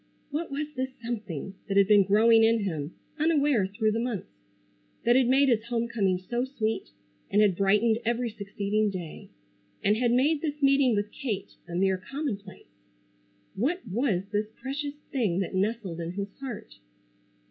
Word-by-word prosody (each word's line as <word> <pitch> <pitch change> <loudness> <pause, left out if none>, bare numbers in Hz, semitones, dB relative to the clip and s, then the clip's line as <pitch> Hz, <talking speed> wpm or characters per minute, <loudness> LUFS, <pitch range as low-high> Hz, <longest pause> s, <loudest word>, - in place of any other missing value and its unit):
What 315 +4 -2
was 290 +2 -2
this 260 0 -1 0.2
something 205 -7 -4
that 195 - 0
had 200 -1 +6
been 205 -1 +7
growing 225 +3 +5
in 225 0 +4
him 160 -5 -3 0.2
unaware 290 - +3
through 215 +2 0
the 225 - -1
months; 230 -5 -3 0.7
that 240 +1 +4
had 260 -2 +4
made 270 +2 +4
his 230 -3 +2
homecoming 230 -5 0
so 240 +7 -2
sweet, 225 -4 -2 0.4
and 205 - +2
had 205 -4 +4
brightened 210 +4 +3
every 235 +1 0
succeeding 210 +1 -1
day; 175 -5 -7 0.5
and 205 +2 +4
had 240 0 +2
made 285 +5 +3
this 300 -2 -3
meeting 275 -3 +4
with 205 +1 -1
Kate 215 -8 -4
a 170 - -6
mere 190 +1 +2
commonplace? 210 -3 -6 0.8
What 275 - -1
was 205 -2 0
this 210 0 0
precious 285 +2 -4 0.2
thing 215 -10 0
that 190 - -4
nestled 195 -3 -1
in 170 +1 -4
his 200 +1 -4
heart? 240 - -7
220 Hz, 160 wpm, -28 LUFS, 195-255 Hz, 0.8 s, been